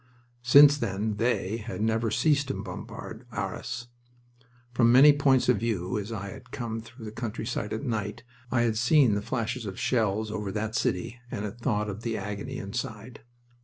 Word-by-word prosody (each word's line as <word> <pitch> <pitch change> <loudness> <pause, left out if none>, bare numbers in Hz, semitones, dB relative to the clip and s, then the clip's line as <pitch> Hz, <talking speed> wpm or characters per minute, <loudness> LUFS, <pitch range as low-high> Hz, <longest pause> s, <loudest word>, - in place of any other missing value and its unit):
Since 145 +4 +7
then 105 -1 -2
"They" 115 -2 0
had 115 0 -6
never 110 +1 +1
ceased 145 +4 +2
to 135 - -2
bombard - - -8
Arras. 120 +1 -4 0.9
From 120 -1 +4
many 140 +4 +8
points 135 -3 +3
of 125 - +4
view, 100 -6 -1
as 105 +2 -6
I 100 -3 -4
had - - -11
come 115 -2 -4
through 115 +1 -12
the 105 - -6
countryside 110 -1 -4
at 110 - -3
night, 105 -5 -3 0.3
I 120 - +3
had 115 -2 +1
seen 130 -2 +5
the 100 - 0
flashes 115 0 -3
of 95 - -6
shells 110 -2 0
over 105 -2 -3
that 110 +1 -2
city 115 +2 -1
and 105 - -4
had 105 +3 -7
thought 105 -4 0
of 105 +1 -5
the 115 -1 -2
agony 105 0 -5
inside. 110 +2 -6
115 Hz, 175 wpm, -28 LUFS, 105-125 Hz, 0.9 s, many